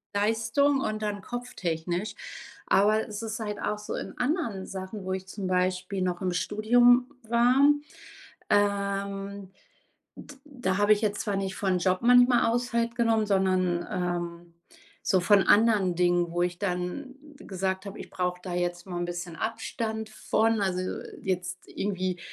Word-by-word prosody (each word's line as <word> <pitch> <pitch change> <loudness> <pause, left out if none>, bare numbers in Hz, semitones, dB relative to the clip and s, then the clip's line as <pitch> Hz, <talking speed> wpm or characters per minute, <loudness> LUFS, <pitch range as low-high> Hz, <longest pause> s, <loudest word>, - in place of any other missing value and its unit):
Leistung 230 +7 +2
und 215 -3 -2
dann 205 -1 -2
kopftechnisch. 185 -5 -3 0.5
Aber 215 +2 +3
es 210 -1 -6
ist 220 0 -4
halt 210 -2 -4
auch 210 0 -1
so 210 - -6
in - - -6
anderen 250 - -1
Sachen, 190 +1 -6
wo 190 - -3
ich 190 0 -5
zum 190 0 -5
Beispiel 185 +1 0
noch 180 0 -2
im 185 -1 0
Studium 245 +7 +4
war, 240 +3 +3 0.9
ähm, 200 -1 -1 0.7
d 290 - -11
da 245 -10 -2
habe 205 +1 +5
ich 210 - -2
jetzt 210 -2 0
zwar 205 -2 -2
nicht 195 -1 -3
von 190 -2 0
Job 185 +1 +1
manchmal 245 0 +6
aus 240 +1 -1
halt 235 0 0
genommen, 225 -2 +2
sondern, 185 -3 +1
ähm, 175 -1 -3 0.5
so 185 - +2
von 195 +2 +5
anderen 205 -3 +4
Dingen, 175 -1 +2
wo 175 +1 -1
ich 175 0 -2
dann 200 +8 -3 0.2
gesagt 190 -2 -3
habe: 200 +1 -7
„Ich - - -8
brauche 180 -1 -2
da 180 - -5
jetzt 175 0 -2
mal 180 -2 -4
'n 175 - -1
bisschen 175 -1 -5
Abstand 220 0 -3
von”, 220 0 +1
also, 185 -1 -1 0.2
jetzt 185 0 -3
irgendwie, 185 -2 -2
200 Hz, 155 wpm, -27 LUFS, 180-220 Hz, 0.9 s, manchmal